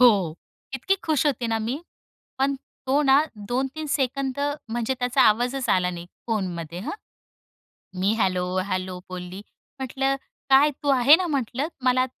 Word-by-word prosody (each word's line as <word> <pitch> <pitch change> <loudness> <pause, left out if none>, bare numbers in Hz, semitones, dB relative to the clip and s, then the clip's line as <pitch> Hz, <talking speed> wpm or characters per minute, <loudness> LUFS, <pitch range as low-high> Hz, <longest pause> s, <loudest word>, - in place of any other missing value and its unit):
हो, 200 -10 +5 0.4
इतकी 385 +10 +1
खुश 310 -2 +1
होते 250 -4 0
ना 225 0 0
मी, 235 +6 -2 0.6
पण 275 +1 +2
तो 270 +1 -2
ना 275 +1 +6 0.3
2-3 270 +5 -2
सेकंद 270 -1 -1 0.3
म्हणजे 240 +3 -1
त्याचा 250 +2 +2
आवाजच 245 +4 +2
आला 180 -1 +3
नाही 175 0 -7 0.2
फोनमध्ये 175 -6 -3
हं. 270 - -4 1.1
मी 200 +3 +2
हॅलो, 185 -2 +1 0.2
हॅलो 185 -1 -2
बोलली. 185 +2 -7 0.4
म्हटलं 270 +1 0 0.3
"काय 280 +3 +6
तू 285 - +1
आहे 270 +2 +7
ना?" 360 0 -1
म्हटलं 275 0 -1 0.2
"मला 255 0 +3
250 Hz, 145 wpm, -25 LUFS, 195-275 Hz, 1.1 s, आहे